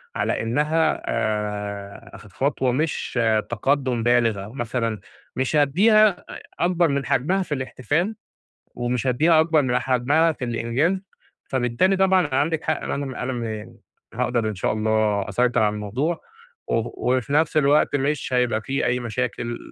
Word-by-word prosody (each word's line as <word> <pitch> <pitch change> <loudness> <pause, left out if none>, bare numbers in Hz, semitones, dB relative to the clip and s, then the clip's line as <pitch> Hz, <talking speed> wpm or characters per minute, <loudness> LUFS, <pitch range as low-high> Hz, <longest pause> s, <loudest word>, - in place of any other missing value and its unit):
على - - -1
إنها 150 +8 +1
آآ، 105 -2 -3
خط 105 - -15
خطوة 130 +2 0
مش 140 -2 -2 0.3
تقدم 130 0 0
بالغة، 115 -4 +2
مثلًا 115 -3 -2 0.4
مش 130 +3 -1
هادّيها 205 +10 +5
أ - - -21 0.4
أكبر 175 0 +2
من 140 -2 -1
حجمها 180 +12 +1
في 160 - -4
الاحتفال، 145 - -2 0.6
ومش 120 +1 -2
هادّيها 155 +6 +4
أكبر 160 -1 +3
من 125 -2 +1
حجمها 135 +6 +2
في 135 - -6
الإنجاز، 125 +10 0 0.5
فبالتالي 130 +9 +1
طبعًا 185 -6 +2
عندك 155 +4 +1
حق 155 - 0
إن - - -4
أنا 140 0 -2
م 130 - -6
أنا 125 +1 -3
م 110 -3 -5 0.4
هاقدر 120 -2 0
إن 110 - -3
شاء 90 - -1
الله 110 -2 0
أسيطر 120 +3 +1
على 105 -1 +2
الموضوع 125 +11 -2 0.5
وه 115 0 -1
وفي 130 +1 -1
نفس 155 +1 +2
الوقت 145 0 +3
مش 140 0 -2
هيبقى 125 -3 +1
في 135 +3 -1
أي 125 +1 0
مشاكل 120 0 -3
125 Hz, 150 wpm, -23 LUFS, 115-150 Hz, 0.6 s, هادّيها